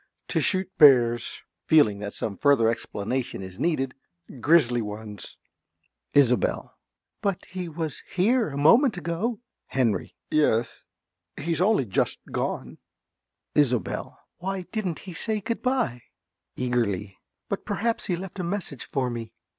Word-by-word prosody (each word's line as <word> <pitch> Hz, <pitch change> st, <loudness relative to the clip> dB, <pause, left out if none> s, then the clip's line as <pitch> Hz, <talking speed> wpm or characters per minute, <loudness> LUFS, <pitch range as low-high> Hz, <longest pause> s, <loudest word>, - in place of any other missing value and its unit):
To -, -, +1 dB
shoot 190 Hz, -1 st, +1 dB
bears. 120 Hz, -5 st, +5 dB, 0.2 s
(Feeling 110 Hz, -11 st, +5 dB
that 105 Hz, 0 st, -5 dB
some 105 Hz, -, -3 dB
further 135 Hz, -5 st, +4 dB
explanation 115 Hz, +1 st, -3 dB
is 95 Hz, 0 st, -9 dB
needed.) 135 Hz, -6 st, 0 dB, 0.5 s
Grizzly 125 Hz, -4 st, +4 dB
ones. 105 Hz, -1 st, -7 dB, 0.8 s
~Isobel.~ 130 Hz, -4 st, +3 dB, 0.5 s
But 200 Hz, -3 st, -1 dB
he 180 Hz, -1 st, -5 dB
was 160 Hz, -2 st, -4 dB
here 220 Hz, +5 st, +2 dB
a 140 Hz, -, -5 dB
moment 225 Hz, -, +5 dB
ago. 180 Hz, +8 st, -2 dB, 0.3 s
~Henry.~ 115 Hz, -8 st, 0 dB, 0.2 s
Yes, 120 Hz, -7 st, +1 dB, 0.5 s
he's 165 Hz, 0 st, -1 dB
only 205 Hz, -, +3 dB
just 95 Hz, -, 0 dB
gone. -, -, -3 dB, 0.7 s
~Isobel.~ 125 Hz, -8 st, 0 dB, 0.2 s
Why 190 Hz, +1 st, -3 dB
didn't 195 Hz, -7 st, -2 dB
he 185 Hz, -, -7 dB
say 215 Hz, +5 st, -1 dB
good 230 Hz, +3 st, -3 dB
bye? 250 Hz, -, 0 dB, 0.5 s
(Eagerly.) 105 Hz, -6 st, -1 dB, 0.3 s
But -, -, -3 dB
perhaps 230 Hz, 0 st, -1 dB
he 180 Hz, -, +1 dB
left 190 Hz, +2 st, -7 dB
a -, -, -1 dB
message 170 Hz, -, -4 dB
for 130 Hz, -3 st, -1 dB
me? 115 Hz, -2 st, -6 dB
145 Hz, 130 wpm, -26 LUFS, 120-185 Hz, 0.8 s, bears